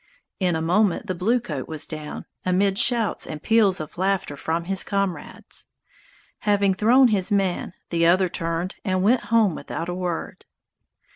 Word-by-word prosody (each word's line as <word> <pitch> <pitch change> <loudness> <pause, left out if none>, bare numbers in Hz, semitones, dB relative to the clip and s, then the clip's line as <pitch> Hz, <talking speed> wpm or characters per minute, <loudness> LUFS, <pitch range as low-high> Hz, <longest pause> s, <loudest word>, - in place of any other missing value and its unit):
In 180 -3 +1
a 160 - -2
moment 195 +4 +2
the 185 - -2
bluecoat 185 - -1
was 155 -1 -1
down, 155 -2 -7 0.2
amid 195 +2 +2
shouts 240 -3 +1
and 155 - -6
peals 215 -1 +3
of 155 +2 -8
laughter 190 -6 0
from 165 +4 -2
his 190 +2 +1
comrades. 195 -3 -4 0.7
Having 200 -2 +2
thrown 240 +7 +5
his 200 -3 +1
man, 190 -3 0 0.2
the 170 -1 +3
other 185 +2 +4
turned 165 +2 -3
and 185 -2 0
went 235 +5 +3
home 225 -6 +3
without 165 +2 -5
a - - -2
word. 180 -2 -4
185 Hz, 155 wpm, -23 LUFS, 170-205 Hz, 0.7 s, thrown